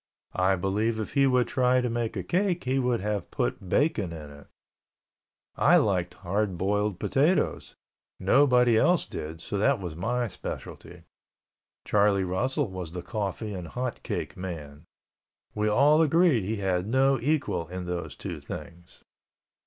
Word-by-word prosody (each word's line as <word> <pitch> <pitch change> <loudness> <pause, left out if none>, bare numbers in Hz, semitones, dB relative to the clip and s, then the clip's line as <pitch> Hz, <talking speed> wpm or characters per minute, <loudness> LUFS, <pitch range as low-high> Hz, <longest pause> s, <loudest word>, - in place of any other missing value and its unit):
I 95 +1 +2
believe 105 +5 -1
if 110 - -5
he 140 -1 +4
would 125 -2 +3
try 125 0 +2
to 125 - 0
make 115 -1 -2
a - - -3
cake 180 -1 0
he 130 +1 0
would 125 -4 0
have 105 -2 -2
put 95 - -3
bacon 120 - +1
in 75 -3 -8
it. 70 0 -14 1.1
I - - +5
liked 90 -3 0
hard 100 0 -2
boiled 105 +1 0
potatoes; 150 - +1 0.4
nobody 125 +2 +4
else 175 +6 +3
did, 80 +2 -7
so 100 - -3
that 135 +3 +3
was 90 -4 -6
my 120 +8 -1
specialty. 100 - -8 0.8
Charlie 100 -2 +3
Russell 120 - -1
was 90 -3 -6
the 90 -1 -5
coffee 105 +2 -4
and 90 -3 -6
hot 125 +7 -4
cake - - -4
man. 80 -5 -7 0.7
We 105 0 0
all 145 +8 +5
agreed 160 - +3
he 110 +3 -1
had 95 -2 -1
no 135 +2 +3
equal 135 - -1
in 90 +1 -6
those 90 -1 -4
two - - -6
things. 85 +2 -10
105 Hz, 155 wpm, -27 LUFS, 90-125 Hz, 1.1 s, I